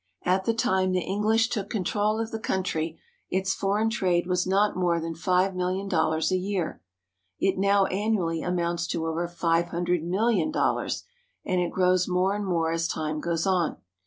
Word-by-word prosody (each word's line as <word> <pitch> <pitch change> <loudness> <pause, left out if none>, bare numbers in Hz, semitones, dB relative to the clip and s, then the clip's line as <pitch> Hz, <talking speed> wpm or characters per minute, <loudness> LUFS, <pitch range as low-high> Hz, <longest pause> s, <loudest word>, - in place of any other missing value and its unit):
At 185 +1 +1
the 230 - +2
time 190 -4 +1
the 180 -1 0
EngHsh 220 +4 +1
took 205 -3 -2
con 210 -5 -2
trol 210 +3 0
of 225 0 -3
the 225 - -4
country, 165 -6 -2 0.3
its 190 0 0
foreign 210 +3 0
trade 180 -6 +1
was 180 0 0
not 200 +2 +2
more 175 -2 +1
than 165 0 -4
five 185 +3 +1
million 185 +2 -1
dollars 160 -2 +1
a 185 - +3
year. 185 -3 -3 0.6
It 190 -1 +1
now 200 0 +4
annually 190 -5 0
amounts 175 -1 -1
to 165 - -2
over 165 +2 -1
five 170 0 +1
hundred 175 -1 -1
million 215 - +1
dollars, 305 - 0 0.4
and 185 -1 +1
it 175 - 0
grows 185 -1 +2
more 185 +1 +1
and 205 -1 -3
more 165 -3 +1
as 165 0 0
time 155 -1 -2
goes 165 0 -1
on. 180 -4 +1
185 Hz, 185 wpm, -26 LUFS, 170-195 Hz, 0.6 s, now